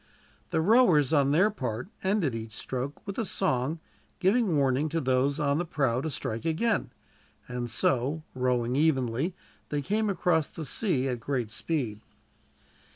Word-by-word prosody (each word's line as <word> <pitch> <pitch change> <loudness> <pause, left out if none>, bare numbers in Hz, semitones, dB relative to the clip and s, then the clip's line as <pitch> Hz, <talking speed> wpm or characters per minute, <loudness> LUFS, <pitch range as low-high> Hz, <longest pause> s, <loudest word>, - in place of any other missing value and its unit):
The 160 -3 +1
rowers, 175 - +5
on 140 -2 +4
their 180 +9 +4
part, 125 - -4 0.2
ended 190 - +1
each 110 -1 -6
stroke 130 +2 -5
with 200 +1 -4
a - - +1
song, 155 - 0 0.4
giving 195 -2 +2
warning 140 +2 +2
to 165 +2 -1
those 135 +2 +1
on 145 0 +1
the - - +1
prow 135 -7 0
to 160 - -2
strike 115 -4 -4
again; 205 +8 0 0.6
and 125 -1 -4
so, 135 +6 0
rowing 125 -1 0
evenly, 140 +2 +1 0.3
they 145 -1 -1
came 210 +5 0
across 170 -5 +1
the 160 - -7
sea 140 - 0
at 125 -2 -2
great 120 -3 -2
speed. 115 -6 -2
145 Hz, 155 wpm, -28 LUFS, 125-170 Hz, 0.6 s, rowers